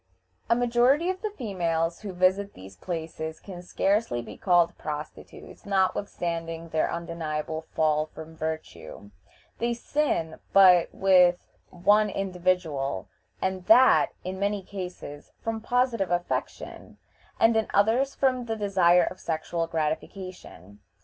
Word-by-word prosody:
A 235 Hz, -, +5 dB
majority 245 Hz, +8 st, +3 dB
of 375 Hz, -, -8 dB
the 430 Hz, -, -2 dB
females 170 Hz, -, -2 dB
who 205 Hz, -2 st, -6 dB
visit 185 Hz, +2 st, +1 dB
these 95 Hz, +1 st, -12 dB
places 160 Hz, -, -5 dB
can 185 Hz, -3 st, -9 dB
scarcely 195 Hz, -, 0 dB
be -, -, -10 dB
called 175 Hz, -2 st, +2 dB
prostitutes, 150 Hz, 0 st, -8 dB
notwithstanding 170 Hz, -4 st, -2 dB
their 160 Hz, -1 st, 0 dB
undeniable 160 Hz, -2 st, -4 dB
fall 155 Hz, -1 st, +2 dB
from 160 Hz, +1 st, -11 dB
virtue. 155 Hz, -10 st, -6 dB, 0.5 s
They 235 Hz, +1 st, 0 dB
sin 235 Hz, -, -1 dB
but 180 Hz, -3 st, +7 dB
with 180 Hz, -2 st, +4 dB, 0.3 s
one 205 Hz, +4 st, +3 dB
individual, 180 Hz, -, -2 dB, 0.3 s
and 190 Hz, -1 st, -2 dB
that, 250 Hz, +4 st, +6 dB
in 185 Hz, +1 st, -5 dB
many 200 Hz, 0 st, -1 dB
cases, 180 Hz, -7 st, -8 dB
from 225 Hz, -1 st, -3 dB
positive 245 Hz, -4 st, 0 dB
affection, 175 Hz, 0 st, -4 dB, 0.4 s
and 225 Hz, 0 st, +4 dB
in 220 Hz, -1 st, +1 dB
others 230 Hz, +7 st, +2 dB
from 255 Hz, -2 st, +1 dB
the 225 Hz, -1 st, -2 dB
desire 185 Hz, -4 st, +3 dB
of 185 Hz, -, -4 dB
sexual 165 Hz, +1 st, -3 dB
gratification. 160 Hz, -, -5 dB
180 Hz, 125 wpm, -26 LUFS, 160-210 Hz, 0.5 s, but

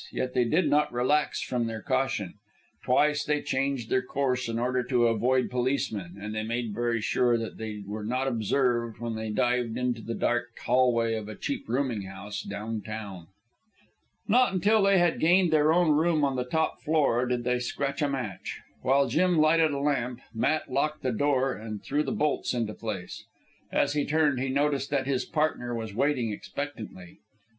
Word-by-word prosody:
Yet 125 Hz, 0 st, -3 dB
they 125 Hz, -1 st, +2 dB
did 155 Hz, +7 st, +2 dB
not 150 Hz, +1 st, +2 dB
relax 130 Hz, +5 st, +1 dB
from 120 Hz, -2 st, -1 dB
their 110 Hz, -2 st, -5 dB
caution. 105 Hz, -8 st, -1 dB, 0.5 s
Twice 150 Hz, +4 st, +3 dB
they 150 Hz, -1 st, 0 dB
changed 135 Hz, -3 st, -1 dB
their 130 Hz, -, +3 dB
course 130 Hz, -2 st, -1 dB
in 115 Hz, -, -2 dB
order 125 Hz, +2 st, 0 dB
to 125 Hz, -1 st, +2 dB
avoid 125 Hz, +3 st, +2 dB
policemen, 120 Hz, -8 st, -1 dB
and 105 Hz, +2 st, -5 dB
they 110 Hz, -, -2 dB
made 115 Hz, 0 st, -3 dB
very 120 Hz, +1 st, 0 dB
sure 120 Hz, +2 st, +2 dB
that 115 Hz, -1 st, -6 dB
they 105 Hz, -2 st, -5 dB
were 105 Hz, +2 st, -5 dB
not 130 Hz, +5 st, -1 dB
observed 120 Hz, -1 st, 0 dB
when 120 Hz, -1 st, -3 dB
they 110 Hz, 0 st, -4 dB
dived 120 Hz, +1 st, 0 dB
into 125 Hz, -2 st, -1 dB
the 115 Hz, +1 st, -4 dB
dark 120 Hz, 0 st, -1 dB
hallway 120 Hz, -3 st, +2 dB
of 110 Hz, -1 st, -4 dB
a 110 Hz, -, -7 dB
cheap 140 Hz, -, -4 dB
rooming 125 Hz, -3 st, 0 dB
house 100 Hz, +1 st, -6 dB
down 105 Hz, +2 st, -5 dB
town. 100 Hz, -6 st, -7 dB, 1.0 s
Not 245 Hz, +4 st, +4 dB
until 205 Hz, +4 st, +3 dB
they 195 Hz, 0 st, +4 dB
had 175 Hz, -2 st, +2 dB
gained 175 Hz, +1 st, +4 dB
their 155 Hz, 0 st, +4 dB
own 170 Hz, -1 st, +4 dB
room 155 Hz, 0 st, +3 dB
on 135 Hz, -1 st, -1 dB
the 125 Hz, -1 st, -1 dB
top 160 Hz, +5 st, -1 dB
floor, 140 Hz, -6 st, +2 dB
did 125 Hz, -1 st, -1 dB
they 125 Hz, 0 st, +1 dB
scratch 140 Hz, +4 st, -3 dB
a 145 Hz, -, +2 dB
match. 130 Hz, -8 st, -4 dB, 0.2 s
While 135 Hz, +1 st, +3 dB
Jim 175 Hz, +7 st, +2 dB
lighted 160 Hz, +1 st, +4 dB
a 140 Hz, -, -2 dB
lamp, 125 Hz, -4 st, -1 dB
Matt 140 Hz, +5 st, 0 dB
locked 150 Hz, +3 st, -1 dB
the 130 Hz, -, +1 dB
door 135 Hz, +1 st, +1 dB
and 110 Hz, -1 st, -7 dB
threw 145 Hz, +2 st, 0 dB
the 140 Hz, -, -2 dB
bolts 150 Hz, -3 st, 0 dB
into 115 Hz, -3 st, -1 dB
place. 100 Hz, -6 st, -6 dB, 0.5 s
As -, -, +2 dB
he 150 Hz, -1 st, +1 dB
turned, 150 Hz, -3 st, +2 dB
he 135 Hz, +1 st, -1 dB
noticed 140 Hz, 0 st, 0 dB
that 140 Hz, -2 st, 0 dB
his 135 Hz, -2 st, 0 dB
partner 150 Hz, -7 st, -1 dB
was 110 Hz, -3 st, -5 dB
waiting 125 Hz, -1 st, +1 dB
expectantly. 105 Hz, -6 st, -7 dB
125 Hz, 185 wpm, -28 LUFS, 115-145 Hz, 1.0 s, Not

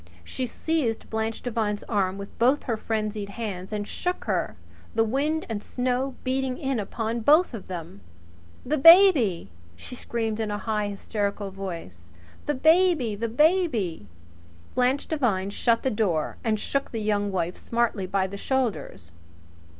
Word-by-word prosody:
She 255 Hz, -, -4 dB
seized 260 Hz, -3 st, -2 dB
Blanche 220 Hz, 0 st, -2 dB
Devine's 220 Hz, -4 st, -1 dB
arm 195 Hz, -3 st, 0 dB
with 200 Hz, 0 st, -9 dB
both 255 Hz, +5 st, +3 dB
her 235 Hz, -, -1 dB
frenzied 215 Hz, -2 st, -3 dB
hands 200 Hz, -4 st, -5 dB
and 210 Hz, -1 st, -3 dB
shook 360 Hz, 0 st, -3 dB
her, -, -, -1 dB, 0.4 s
the 225 Hz, -, +4 dB
wind 285 Hz, +8 st, 0 dB
and 220 Hz, -3 st, -3 dB
snow 255 Hz, +1 st, -1 dB
beating 260 Hz, 0 st, -1 dB
in 270 Hz, -5 st, -1 dB
upon 225 Hz, +3 st, -3 dB
both 300 Hz, +7 st, +4 dB
of 220 Hz, -5 st, -7 dB
them. 165 Hz, -, -7 dB, 0.6 s
"The 300 Hz, +3 st, 0 dB
baby!" 290 Hz, -, +7 dB, 0.2 s
she 85 Hz, -, -9 dB
screamed 225 Hz, -3 st, -3 dB
in 220 Hz, -1 st, -1 dB
a 205 Hz, -, -2 dB
high, 210 Hz, -1 st, -1 dB
hysterical 200 Hz, 0 st, -3 dB
voice. 165 Hz, -, -7 dB, 0.4 s
"The 295 Hz, -, +1 dB
baby! 315 Hz, -, +4 dB
The 230 Hz, +3 st, -3 dB
baby 245 Hz, -, +1 dB, 0.4 s
" 85 Hz, 0 st, -25 dB
Blanche 255 Hz, +3 st, +1 dB
Devine 210 Hz, -11 st, 0 dB
shut 230 Hz, +2 st, +1 dB
the 265 Hz, -, +1 dB
door 180 Hz, -8 st, 0 dB
and 220 Hz, -2 st, +1 dB
shook 275 Hz, +5 st, -2 dB
the 225 Hz, -, -4 dB
Young 205 Hz, -1 st, 0 dB
Wife 180 Hz, -1 st, -1 dB
smartly 230 Hz, -5 st, -1 dB
by 190 Hz, 0 st, +1 dB
the 195 Hz, +1 st, -6 dB
shoulders. 225 Hz, -, -2 dB
220 Hz, 155 wpm, -26 LUFS, 200-260 Hz, 0.6 s, baby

